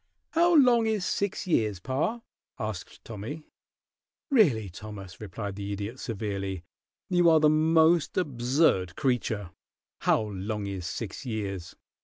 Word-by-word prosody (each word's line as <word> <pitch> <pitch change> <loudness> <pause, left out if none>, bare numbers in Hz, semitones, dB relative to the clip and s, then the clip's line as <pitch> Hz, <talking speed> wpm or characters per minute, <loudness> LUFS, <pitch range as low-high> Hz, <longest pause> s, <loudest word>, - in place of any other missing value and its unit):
"How 340 +1 +4
long 245 -6 +5
is 215 -4 0
six 200 0 -1
years, 110 - +1
pa?" 140 - -1 0.4
asked 110 -4 -6
Tommy. 115 +9 -6 0.9
"Really, 145 - +4
Thomas," 95 0 -9
replied 100 0 -5
the 100 0 -4
Idiot, 105 +5 -5
severely, 100 -5 -4 0.5
"you 175 -1 +5
are 160 -1 +6
the 150 -1 +5
most 160 +1 +3
absurd 130 - +2
creature. 120 - -1 0.5
How - - +2
long 105 +1 -4
is 95 -3 -4
six 95 +5 -5
years!" 100 -7 -4
115 Hz, 125 wpm, -28 LUFS, 100-160 Hz, 0.9 s, are